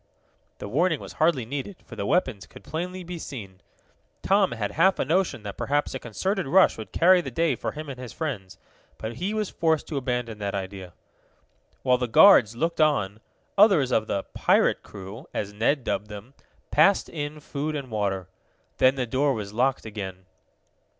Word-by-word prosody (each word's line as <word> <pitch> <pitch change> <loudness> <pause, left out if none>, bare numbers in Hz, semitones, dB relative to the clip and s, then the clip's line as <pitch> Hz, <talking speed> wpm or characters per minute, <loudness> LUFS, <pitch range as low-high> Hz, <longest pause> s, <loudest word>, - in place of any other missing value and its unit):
The - - -7
warning 160 - +1
was - - -9
hardly 155 -7 +3
needed, 145 - -6
for - - -10
the - - -3
weapons 130 - 0
could - - -14
plainly 180 +3 -5
be 175 0 -7
seen. 100 -11 -8 0.6
Tom 195 0 +3
had 105 -3 -3
half 185 +4 +3
a - - 0
notion 165 - 0
that 100 -2 -7
perhaps 145 +1 0
a 130 - -4
concerted 190 - -2
rush 190 +6 +5
would 110 - -9
carry 180 +1 +5
the - - -6
day 165 0 +1
for - - -4
him 155 0 -7
and 135 -2 -7
his 125 -2 -7
friends, 125 - -5 0.4
but 110 +1 -6
he 195 +5 -2
was 215 -2 -2
forced 160 -2 +1
to 150 - -3
abandon 125 -4 -2
that 100 -1 -3
idea. 95 -2 -6 0.9
While 125 -1 +3
the 125 - -1
guards 115 - +7
looked 165 +6 -1
on, 110 -10 +2 0.4
others 185 - +5
of 110 -3 +1
the 100 - -1
"pirate - - +3
crew," 105 - -10
as 105 0 -3
Ned 120 +6 +1
dubbed 105 -3 -2
them, 105 +5 -10 0.4
passed 185 +7 +4
in 150 -1 -5
food 150 +1 -4
and 135 -4 -5
water. 100 -4 -1 0.5
Then 130 +1 +4
the 130 -2 -1
door 135 +3 +1
was 105 -2 -6
locked 130 +3 +1
again. 95 -4 -7
130 Hz, 185 wpm, -25 LUFS, 105-165 Hz, 0.9 s, guards